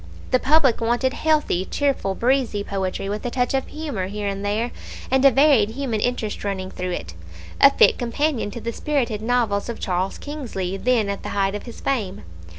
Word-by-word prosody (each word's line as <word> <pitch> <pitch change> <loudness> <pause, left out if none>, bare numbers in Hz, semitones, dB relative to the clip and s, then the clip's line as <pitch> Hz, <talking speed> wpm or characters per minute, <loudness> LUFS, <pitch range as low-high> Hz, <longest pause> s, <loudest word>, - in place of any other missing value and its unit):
The 255 - +4
public 270 -4 +3
wanted 240 +3 +1
healthy, 305 - +1
cheerful, 270 -5 -1
breezy 240 -4 +1
poetry, 195 -1 -3
with 205 +1 -3
a 245 - -1
touch 245 +1 0
of 265 -1 0
humour 290 -12 -4
here 205 +1 -4
and 195 0 -3
there, 215 +4 -1 0.4
and 265 0 +3
a 275 - +9
varied 270 -5 +4
human 235 -2 -2
interest 220 -2 -2
running 190 -2 -3
through 180 0 -4
it 85 - -5 0.5
a 275 - +10
fit - - +4
companion 250 0 -1
to 220 - -7
the 230 +1 -4
spirited 245 -8 -1
novels 225 -3 0
of 235 - -5
Charles 185 0 -1
Kingsley, 235 -11 -4
then 230 +1 +1
at 200 0 -3
the - - -6
height 195 0 +2
of 205 +4 -6
his 235 - -9
fame. 215 -9 -2
230 Hz, 190 wpm, -22 LUFS, 200-265 Hz, 0.5 s, a